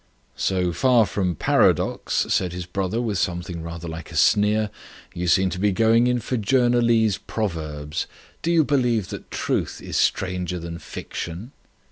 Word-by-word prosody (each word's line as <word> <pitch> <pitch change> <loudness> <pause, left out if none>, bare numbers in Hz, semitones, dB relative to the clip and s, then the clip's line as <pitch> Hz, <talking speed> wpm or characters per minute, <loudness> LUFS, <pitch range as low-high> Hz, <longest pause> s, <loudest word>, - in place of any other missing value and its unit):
"So 90 -2 0
far 125 +1 +4
from 90 -4 -1
paradox," - - +2
said 90 -2 0
his 90 -1 -5
brother, 95 +4 -2
with 110 -5 -1
something 85 -2 -2
rather 85 +1 -7
like 80 0 -7
a - - -9
sneer, 105 +1 +3 0.4
"you 90 0 -3
seem 95 +1 +3
to 90 - -4
be 105 +1 +2
going 115 +4 +4
in 125 0 +2
for 120 +2 -2
journalese 120 -2 +3
proverbs. 80 -7 -3 0.3
Do 170 - 0
you 165 -2 +5
believe 125 -8 +1
that - - -8
truth - - -2
is - - -4
stranger 90 -1 0
than 85 0 -6
fiction?" 85 +10 -7
95 Hz, 155 wpm, -23 LUFS, 85-115 Hz, 0.4 s, you